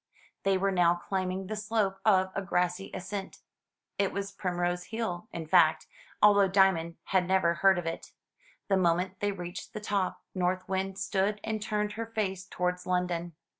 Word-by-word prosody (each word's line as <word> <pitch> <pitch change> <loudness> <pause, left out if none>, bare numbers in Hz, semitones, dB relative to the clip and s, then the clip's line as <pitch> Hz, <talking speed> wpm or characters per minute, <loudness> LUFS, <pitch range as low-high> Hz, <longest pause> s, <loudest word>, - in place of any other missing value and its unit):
They 195 -1 +2
were 195 +1 +1
now 175 -2 +4
climbing 185 +1 -3
the 215 +3 -4
slope 210 -2 -1
of 190 -3 +4
a 195 - -2
grassy 180 0 -1
ascent. 195 +1 -5 0.6
It 200 -1 +2
was 200 0 -4
Primrose 175 -2 -2
Hill, 220 -4 -4
in 165 -1 -5
fact, 160 -1 +4 0.4
although 205 -1 +7
Diamond 185 -4 +3
had 185 -2 +1
never 185 -3 +3
heard 190 +2 +4
of 175 - -3
it. 165 - -5 0.6
The 195 - +3
moment 185 +1 +1
they 205 0 0
reached 175 -2 -7
the - - -4
top, 200 -3 -1
North 185 0 -1
Wind 190 0 -2
stood 195 +1 0
and 220 -1 -2
turned 210 0 -1
her 225 +2 -5
face 195 -5 -2
towards 180 0 -2
London. 175 -2 -1
190 Hz, 170 wpm, -29 LUFS, 180-200 Hz, 0.6 s, although